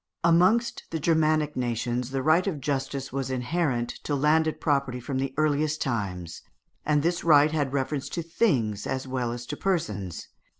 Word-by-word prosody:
Amongst 180 +8 +3
the 165 - -3
Germanic 155 -1 +2
nations 120 0 -2
the 135 -1 -2
right 160 +6 +3
of 165 -7 -2
justice 135 -1 -3
was 135 -1 -2
inherent 130 -1 -1
to 145 - -1
landed 155 +3 +2
property 140 -4 0
from 130 +2 -3
the 135 0 -1
earliest 155 0 +1
times, 95 - -3 0.4
and 150 -1 +2
this 170 +1 0
right 150 -2 +6
had 145 -4 0
reference 140 0 -2
to 170 - -1
things 130 - 0
as 130 0 -3
well 125 -2 -2
as 120 0 -6
to 150 - -5
persons. 105 - -2
140 Hz, 165 wpm, -26 LUFS, 125-155 Hz, 0.4 s, right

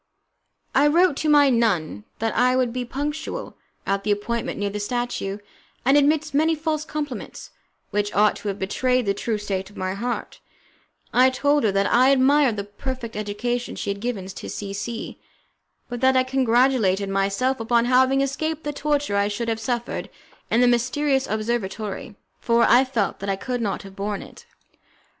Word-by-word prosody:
I 285 +2 +5
wrote 335 +1 +4
to 310 - 0
my 290 -2 +6
nun 180 - 0
that 225 0 -2
I 255 +1 +3
would 250 -2 +1
be 250 0 -2
punctual 295 - -4 0.3
at 195 0 -1
the 210 - -3
appointment 215 +3 -1
near 205 0 -2
the 210 - -4
statue, 210 -3 -2 0.5
and 270 +2 +5
amidst 295 +1 +2
many 315 +3 +3
false 310 -1 -2
compliments, 290 -7 -6 0.4
which 205 0 0
ought 210 +1 +4
to - - -7
have 200 -1 -2
betrayed 250 +6 0
the 200 - +1
true 215 +2 -2
state 195 -2 -3
of 205 - -16
my 185 0 -2
heart, 235 +5 -4 0.7
I 255 +1 +6
told 285 +2 +1
her 210 - +3
that 195 0 +2
I 255 +5 +4
admired 275 -3 +4
the 200 - -2
perfect 230 +3 -6
education 215 +4 -3
she - - -3
had 200 - -5
given 220 -4 -3
to 190 0 -8
C 200 -1 -5
C, 225 +3 -5 0.7
but 245 0 -6
that 260 0 +4
I 255 - +4
congratulated 245 -6 +2
myself 195 +7 0
upon 235 +1 +2
having 260 +2 +4
escaped 310 +3 -2
the 295 - -3
torture 290 -7 0
I 200 0 +2
should 230 +3 -3
have 225 -1 -1
suffered 240 +1 -3 0.4
in 235 - +3
the 250 - +5
mysterious 265 +3 +1
observatory, 215 +1 -3 0.2
for 235 0 +3
I 250 +2 +5
felt 235 -6 -1
that 200 - -4
I 195 - +1
could 245 +5 -3
not 205 -2 -2
have 195 0 -12
borne 200 0 -3
it. - - -15
240 Hz, 180 wpm, -23 LUFS, 205-265 Hz, 0.7 s, my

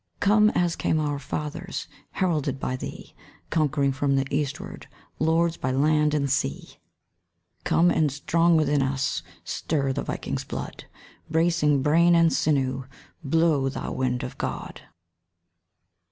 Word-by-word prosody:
Come, 210 +1 +5
as 175 -1 +1
came 160 - 0
our 145 -2 -1
fathers, 150 +2 -5 0.3
Heralded 150 -7 0
by 130 - -2
thee, 130 - -8 0.4
Conquering 145 -3 +1
from 140 0 0
the 135 0 +1
eastward, 150 +6 -4 0.3
Lords 165 +1 +2
by 130 - -2
land 150 +3 +2
and 140 -2 +1
sea. 125 - -2 0.9
Come; 175 +1 +4
and 155 -3 +2
strong 165 +4 +2
within 145 -2 +2
us 135 0 -1 0.2
Stir 140 -4 -1
the - - -2
Vikings' - - -4
blood; - - -7 0.4
Bracing 160 -4 +2
brain 170 +4 +4
and 165 -2 +4
sinew; 135 -2 0 0.4
Blow, 150 -2 +2
thou 135 - -5
wind 125 -1 -1
of - - -7
God! - - -5
150 Hz, 130 wpm, -25 LUFS, 135-165 Hz, 0.9 s, Come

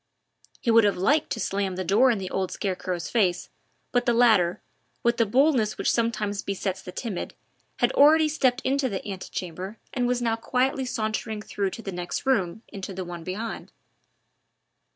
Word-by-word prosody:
He 235 - +1
would 225 0 +7
have 205 -2 +2
liked 285 +12 +2
to 225 - -5
slam 195 -3 -1
the 185 - -2
door 210 +9 +4
in 235 - +2
the 190 -1 -5
old 190 -1 -1
scarecrow's 185 -3 -3
face, 190 -7 +1 0.4
but 245 0 +1
the 240 - +3
latter, 215 -8 +4 0.4
with 235 -1 +2
the 230 - +3
boldness 250 -2 +3
which - - +1
sometimes 215 -3 0
besets 190 -1 -3
the 180 - -8
timid, 210 -2 -5 0.4
had - - +2
already 310 +2 +6
stepped 270 -4 +1
into 270 0 +1
the 195 -1 -4
anti 195 -2 -6
chambre 185 +4 -5 0.2
and 245 -2 0
was 245 0 +1
now 230 -2 +1
quietly 255 +3 0
sauntering 220 -2 -3
through 200 -2 -2
to 225 - -9
the 195 - -4
next 175 +5 -4
room 220 -5 +1
into 195 -1 -7
the 185 0 -4
one 175 -1 -7
beyond. 210 +6 -5
215 Hz, 180 wpm, -26 LUFS, 190-245 Hz, 0.4 s, would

